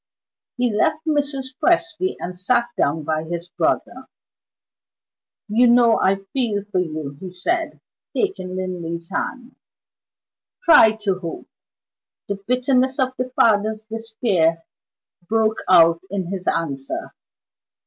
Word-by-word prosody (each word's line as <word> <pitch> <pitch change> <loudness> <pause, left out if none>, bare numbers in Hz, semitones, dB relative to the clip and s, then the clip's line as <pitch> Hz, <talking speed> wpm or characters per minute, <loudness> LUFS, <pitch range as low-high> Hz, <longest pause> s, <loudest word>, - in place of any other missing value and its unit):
He 245 -3 +1
left 300 +9 +1
Mrs. 285 -4 -1
Presty 345 +2 +1
and 180 +1 -6
sat 235 +6 +1
down 150 +2 0
by 155 +1 -1
his 170 +1 -5
brother. - - -1 1.4
"You 230 +4 +4
know 235 -1 +5
I 195 +1 +2
feel 225 -7 0
for 205 -3 -1
you," 155 -5 -4
he 185 -1 -7
said, 330 - -2 0.4
taking 385 - -2
Linley's 170 -2 -5
hand. 255 0 -4 1.1
"Try 225 -9 +7
to 190 -3 0
hope." 170 -3 -7 0.8
The 200 -1 -3
bitterness 255 +1 +2
of 260 -2 +1
the 255 0 -2
father's 215 0 +3
despair 220 -7 0 0.7
broke 220 0 +1
out 170 -2 +6
in 190 -2 -3
his 190 -2 -5
answer. 140 -5 -2
210 Hz, 120 wpm, -21 LUFS, 175-250 Hz, 1.4 s, Try